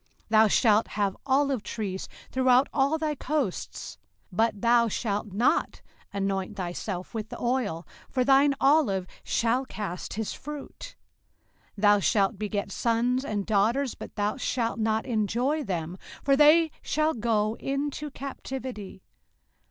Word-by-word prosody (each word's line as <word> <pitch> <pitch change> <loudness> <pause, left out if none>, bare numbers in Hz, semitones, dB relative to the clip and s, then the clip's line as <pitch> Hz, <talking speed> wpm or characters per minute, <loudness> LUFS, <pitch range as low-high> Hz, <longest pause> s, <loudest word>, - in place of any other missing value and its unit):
05:028:040 - - -40 0.2
Thou 220 0 +6
shalt 215 0 +4
have 200 -2 -1
olive 275 -2 +2
trees 200 -3 -5 0.2
throughout 260 +1 +4
all 280 +3 +2
thy 310 -1 -1
coasts, 280 -8 -3 0.3
but 215 +2 +1
thou 235 +1 +4
shalt 210 -1 -2
not 225 +8 +1 0.3
anoint 195 0 -2
thyself 180 +1 -4
with 220 -1 -4
the - - -8
oil; 235 -10 -1 0.2
for 255 - +1
thine 275 +2 +5
olive 270 -11 +3 0.2
shall 235 +3 +1
cast 200 -8 -5
his 220 -1 -3
fruit. 300 - -8 0.8
05:028:041 - - -8
Thou 205 0 +6
shalt 200 +1 +1
beget 205 -1 -3
sons 240 +4 +1
and 205 -6 -2
daughters, 230 +6 +1
but - - -10
thou 210 +3 -1
shalt 230 -3 -1
not 220 0 0
enjoy 245 +6 0
them; 175 - -4 0.2
for 275 0 +4
they 310 +3 +6
shall 310 +1 +1
go 220 -1 0
into 285 +2 -3
captivity. 260 -7 -7
230 Hz, 135 wpm, -27 LUFS, 205-270 Hz, 0.8 s, Thou